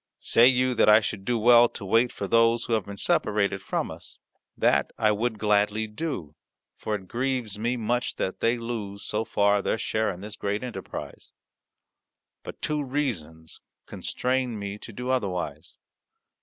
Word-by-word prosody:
Say 120 Hz, +1 st, +5 dB
you 130 Hz, 0 st, +3 dB
that 115 Hz, -, +4 dB
I 105 Hz, +1 st, +8 dB
should 105 Hz, -3 st, -4 dB
do 120 Hz, +1 st, +1 dB
well 120 Hz, +1 st, +6 dB
to 100 Hz, -, -8 dB
wait 115 Hz, +5 st, +3 dB
for 100 Hz, -, -5 dB
those 115 Hz, +2 st, +3 dB
who 115 Hz, -, -2 dB
have 110 Hz, -4 st, 0 dB
been 100 Hz, 0 st, -7 dB
separated 100 Hz, -1 st, +1 dB
from -, -, -2 dB
us? -, -, -9 dB, 0.4 s
That -, -, +2 dB
I 110 Hz, -1 st, +3 dB
would 110 Hz, +2 st, -1 dB
gladly 105 Hz, +1 st, +1 dB
do, 105 Hz, -, -5 dB, 0.4 s
for 105 Hz, -, -3 dB
it 95 Hz, -2 st, -8 dB
grieves 120 Hz, -3 st, -2 dB
me 120 Hz, +3 st, 0 dB
much 120 Hz, +2 st, -1 dB
that 95 Hz, -, -3 dB
they 115 Hz, +1 st, +2 dB
lose, 110 Hz, -4 st, -5 dB
so 105 Hz, +1 st, 0 dB
far, 100 Hz, -2 st, +2 dB
their 110 Hz, -, 0 dB
share 110 Hz, -1 st, -1 dB
in 90 Hz, -2 st, -6 dB
this 105 Hz, +1 st, -8 dB
great 105 Hz, +3 st, -2 dB
enterprise. 125 Hz, -2 st, -7 dB, 1.1 s
But -, -, -10 dB
two 150 Hz, -1 st, 0 dB
reasons 90 Hz, -, -4 dB, 0.2 s
constrain 125 Hz, -2 st, -2 dB
me 100 Hz, 0 st, -5 dB
to 115 Hz, -, -9 dB
do 125 Hz, +4 st, -4 dB
otherwise. 100 Hz, -9 st, -3 dB
110 Hz, 170 wpm, -26 LUFS, 100-120 Hz, 1.1 s, I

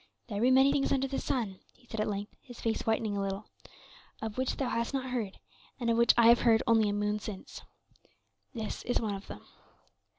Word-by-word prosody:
"There 205 Hz, -1 st, -2 dB
be 245 Hz, -, +5 dB
many 265 Hz, +2 st, +6 dB
things 280 Hz, -1 st, +1 dB
under 270 Hz, 0 st, +2 dB
the 270 Hz, -, -2 dB
sun," 220 Hz, -8 st, -2 dB, 0.2 s
he 250 Hz, -, -25 dB
said 225 Hz, -2 st, -6 dB
at -, -, 0 dB
length, 205 Hz, 0 st, -4 dB
his 245 Hz, -2 st, -12 dB
face 225 Hz, +1 st, -2 dB
whitening 220 Hz, -2 st, +1 dB
a 200 Hz, -, -1 dB
little 195 Hz, +1 st, -3 dB, 0.7 s
"of 220 Hz, -1 st, -5 dB
which 260 Hz, 0 st, -1 dB
thou 265 Hz, -3 st, -1 dB
hast 235 Hz, +4 st, -1 dB
not 260 Hz, -1 st, -3 dB
heard, 220 Hz, -6 st, -3 dB, 0.4 s
and 235 Hz, -2 st, +1 dB
of 230 Hz, -, +2 dB
which 235 Hz, -, +6 dB
I 235 Hz, -, +6 dB
have 235 Hz, -, +7 dB
heard 225 Hz, -2 st, +4 dB
only 225 Hz, -3 st, +4 dB
a -, -, -1 dB
moon 210 Hz, +1 st, 0 dB
since. 205 Hz, -2 st, -8 dB, 0.9 s
This 220 Hz, -4 st, -5 dB
is 245 Hz, -, +1 dB
one 215 Hz, -3 st, -2 dB
of 195 Hz, 0 st, -7 dB
them." -, -, -10 dB
230 Hz, 220 wpm, -30 LUFS, 210-250 Hz, 0.9 s, have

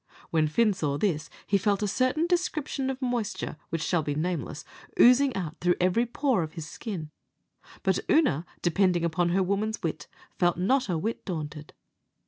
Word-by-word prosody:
When 155 Hz, -2 st, +3 dB
Fin 215 Hz, +7 st, +3 dB
saw 145 Hz, -6 st, -1 dB
this, 155 Hz, -4 st, -1 dB, 0.2 s
he 200 Hz, -1 st, +2 dB
felt 205 Hz, +1 st, +1 dB
a -, -, +1 dB
certain 255 Hz, -, +1 dB
description 315 Hz, -6 st, -1 dB
of 265 Hz, 0 st, -4 dB
moisture, 240 Hz, -10 st, -2 dB
which 165 Hz, -1 st, -2 dB
shall 175 Hz, -3 st, +1 dB
be 145 Hz, -1 st, -2 dB
nameless, 160 Hz, -2 st, -3 dB, 0.3 s
oozing 255 Hz, +2 st, +6 dB
out 170 Hz, -4 st, -4 dB
through 175 Hz, 0 st, +3 dB
every 185 Hz, +7 st, +2 dB
pore 260 Hz, -3 st, +1 dB
of 155 Hz, -1 st, -4 dB
his 160 Hz, -3 st, -6 dB
skin; 165 Hz, -4 st, -6 dB, 0.7 s
but -, -, +2 dB
Oonagh, 180 Hz, -, +3 dB, 0.2 s
depending 175 Hz, 0 st, +2 dB
upon 170 Hz, +1 st, +1 dB
her 190 Hz, +2 st, +2 dB
woman's 205 Hz, +3 st, -1 dB
wit, 155 Hz, -2 st, -3 dB, 0.3 s
felt 175 Hz, -1 st, +3 dB
not 230 Hz, +6 st, +1 dB
a 175 Hz, -, +1 dB
whit 220 Hz, +8 st, -3 dB
daunted. 155 Hz, -4 st, -6 dB
185 Hz, 170 wpm, -27 LUFS, 160-235 Hz, 0.7 s, oozing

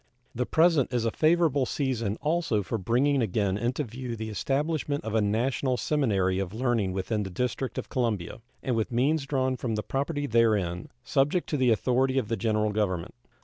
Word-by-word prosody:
The 125 Hz, +1 st, -2 dB
present 160 Hz, -6 st, +3 dB
is 120 Hz, -2 st, 0 dB
a 115 Hz, -, +1 dB
favorable 155 Hz, -4 st, +2 dB
season 115 Hz, -7 st, -1 dB
also 155 Hz, -8 st, 0 dB
for 110 Hz, +4 st, -3 dB
bringing 130 Hz, +8 st, +2 dB
again 100 Hz, -2 st, 0 dB
into 120 Hz, +7 st, -1 dB
view 120 Hz, 0 st, -6 dB
the 110 Hz, 0 st, -5 dB
establishment 145 Hz, -, -1 dB
of 110 Hz, -, -3 dB
a 110 Hz, -, +3 dB
national 125 Hz, +5 st, 0 dB
seminary 100 Hz, -12 st, +1 dB
of 95 Hz, +1 st, -4 dB
learning 115 Hz, -5 st, 0 dB
within 100 Hz, +3 st, -1 dB
the 95 Hz, -, -4 dB
District 125 Hz, +6 st, -3 dB
of -, -, -3 dB
Columbia, 115 Hz, -6 st, -2 dB, 0.2 s
and 125 Hz, -, 0 dB
with 110 Hz, +1 st, -1 dB
means 140 Hz, +4 st, +1 dB
drawn 130 Hz, -2 st, 0 dB
from 115 Hz, -4 st, -2 dB
the 105 Hz, -, -2 dB
property 145 Hz, +2 st, -2 dB
therein, 110 Hz, -8 st, +1 dB
subject 145 Hz, +6 st, +1 dB
to 150 Hz, -, 0 dB
the 130 Hz, -2 st, +3 dB
authority 130 Hz, +4 st, +2 dB
of 115 Hz, -6 st, 0 dB
the 115 Hz, -, +1 dB
General 110 Hz, -2 st, 0 dB
Government. 100 Hz, -3 st, -1 dB
120 Hz, 185 wpm, -27 LUFS, 105-135 Hz, 0.2 s, present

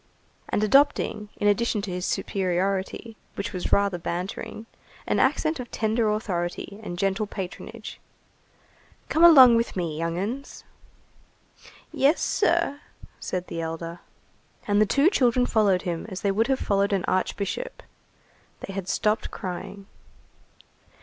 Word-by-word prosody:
And 210 Hz, -, 0 dB
adopting, 215 Hz, -3 st, +2 dB
in 205 Hz, -, 0 dB
addition 215 Hz, +1 st, +2 dB
to 200 Hz, -, -4 dB
his 180 Hz, +1 st, -3 dB
superiority, 195 Hz, +3 st, -2 dB, 0.2 s
which 200 Hz, +2 st, -4 dB
was 180 Hz, -, -4 dB
rather 200 Hz, -3 st, +2 dB
bantering, 180 Hz, +6 st, -5 dB, 0.4 s
an -, -, 0 dB
accent 315 Hz, -2 st, +1 dB
of 245 Hz, -, -6 dB
tender 220 Hz, 0 st, 0 dB
authority 200 Hz, -1 st, -3 dB
and 175 Hz, -5 st, -6 dB
gentle 195 Hz, +3 st, 0 dB
patronage:— 190 Hz, -2 st, -7 dB, 1.1 s
"Come 325 Hz, -, +2 dB
along 260 Hz, -8 st, +9 dB
with 230 Hz, -, -1 dB
me, 170 Hz, -4 st, -2 dB
young 165 Hz, +1 st, -2 dB
'uns!" 240 Hz, +9 st, -5 dB, 1.3 s
"Yes, 285 Hz, +4 st, +3 dB
sir," 340 Hz, -7 st, +1 dB, 0.4 s
said 180 Hz, -1 st, -3 dB
the 165 Hz, -, -5 dB
elder. 165 Hz, +1 st, -5 dB, 0.7 s
And 205 Hz, 0 st, +3 dB
the 215 Hz, -, +4 dB
two 280 Hz, -, +3 dB
children 250 Hz, -, +3 dB
followed 205 Hz, -6 st, +2 dB
him 170 Hz, +2 st, -3 dB
as 185 Hz, -1 st, -6 dB
they 200 Hz, -, +1 dB
would 220 Hz, +4 st, +1 dB
have 270 Hz, -, +2 dB
followed 200 Hz, -2 st, +1 dB
an 190 Hz, -3 st, 0 dB
archbishop. 200 Hz, -, -2 dB, 0.8 s
They 195 Hz, -, -7 dB
had 190 Hz, -2 st, -5 dB
stopped 210 Hz, +3 st, 0 dB
crying. 195 Hz, +2 st, -7 dB
200 Hz, 135 wpm, -25 LUFS, 185-230 Hz, 1.3 s, along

